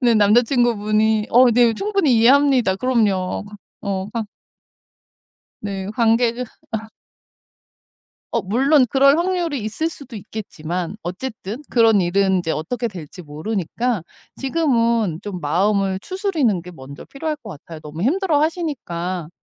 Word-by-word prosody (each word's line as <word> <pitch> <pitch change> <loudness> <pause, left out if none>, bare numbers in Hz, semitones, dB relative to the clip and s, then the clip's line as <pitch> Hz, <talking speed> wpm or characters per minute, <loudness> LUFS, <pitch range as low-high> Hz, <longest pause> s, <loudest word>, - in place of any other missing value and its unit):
네 240 -3 +3
남자친구분이 220 -1 +2
어 245 +1 +6
네 235 0 +4
충분히 395 - +1
이해합니다. 255 -3 +4
그럼요. 210 -7 0
과 210 0 -11 0.2
어 195 -1 -3
과 230 -2 -2 1.4
네. 195 -2 -4
관계를 235 +1 +2 1.9
어 230 - 0
물론 265 - +3
그럴 275 +1 +5
확률이 340 -5 -1
있을 220 +10 -2
수도 280 -6 -11
있겠지만 180 -4 -5
어쨌든 215 - -6
그런 225 -4 +4
일은 190 +1 +2
이제 165 -2 -3
어떻게 220 +11 -2
될지 180 -4 -8
모르니까 195 +7 -3 0.3
지금은 235 - +1
좀 195 -4 -6
마음을 190 +5 +1
추스는 330 - 0
게 180 +2 -11
먼저 140 -3 -11
필요할 305 +2 -4
것 260 -7 -13
같아요. 160 0 -10
너무 155 +2 -7
힘들어하시니까 290 - -1
225 Hz, 280 characters per minute, -20 LUFS, 190-265 Hz, 1.9 s, 어